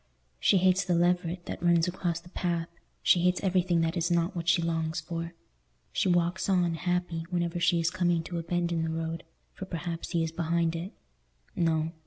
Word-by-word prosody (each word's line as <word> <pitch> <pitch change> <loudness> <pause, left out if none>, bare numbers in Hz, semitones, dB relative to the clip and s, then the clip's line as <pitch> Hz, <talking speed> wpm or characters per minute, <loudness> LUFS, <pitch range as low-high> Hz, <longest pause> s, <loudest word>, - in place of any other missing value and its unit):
She 195 - +4
hates 185 +1 +3
the 180 -2 +1
leveret 175 0 +1
that - - -6
runs 170 0 +3
across 175 -2 -2
the 175 +1 -16
path; 170 -2 -2 0.3
she 175 - +5
hates 180 +1 +2
everything 180 -3 +2
that 165 +1 0
is 170 0 0
not 170 +1 +1
what 170 -1 -1
she 170 - +4
longs 165 -1 -1
for. 165 +1 -5 0.6
She - - +1
walks 175 +2 +1
on, 180 -3 +2
happy 175 0 -2
whenever 175 -1 -1
she 170 0 +3
is 165 +1 +1
coming 175 -2 +1
to 170 +1 -4
a - - -2
bend 170 +1 -1
in 165 -1 0
the 160 - -1
road, 165 +1 -3 0.3
for 190 - -7
perhaps 170 -2 -5
he 165 -1 +2
is 160 - -2
behind 165 0 0
it. 175 +4 -5 0.6
No. 160 -1 +1
170 Hz, 200 wpm, -29 LUFS, 165-180 Hz, 0.6 s, she